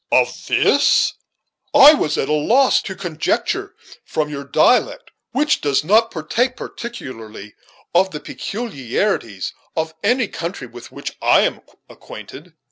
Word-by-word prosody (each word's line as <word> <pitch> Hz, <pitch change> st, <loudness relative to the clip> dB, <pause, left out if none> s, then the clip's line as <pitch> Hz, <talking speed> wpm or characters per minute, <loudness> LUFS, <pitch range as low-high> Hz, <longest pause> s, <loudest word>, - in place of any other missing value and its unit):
"Of -, -, +1 dB
this! -, -, +3 dB, 0.6 s
I 290 Hz, +3 st, +10 dB
was 155 Hz, -, 0 dB
at -, -, -1 dB
a 150 Hz, -, 0 dB
loss 240 Hz, -, +3 dB
to 190 Hz, -, -7 dB
conjecture, 175 Hz, -4 st, -2 dB, 0.3 s
from 150 Hz, -1 st, -2 dB
your 140 Hz, -1 st, -6 dB
dialect, 250 Hz, -, +2 dB, 0.2 s
which 295 Hz, +2 st, +1 dB
does 145 Hz, -1 st, +1 dB
not 220 Hz, +7 st, +4 dB
partake, 235 Hz, +11 st, -1 dB
particularly, 115 Hz, -, -8 dB, 0.4 s
of 185 Hz, +2 st, +4 dB
the 150 Hz, -, -6 dB
peculiarities 140 Hz, -, -3 dB, 0.2 s
of 160 Hz, 0 st, -2 dB
any 240 Hz, +2 st, +2 dB
country 170 Hz, -7 st, -6 dB
with 120 Hz, 0 st, -12 dB
which -, -, -7 dB
I -, -, +5 dB
am -, -, -1 dB, 0.3 s
acquainted. 140 Hz, -, -12 dB
165 Hz, 130 wpm, -19 LUFS, 140-230 Hz, 0.6 s, I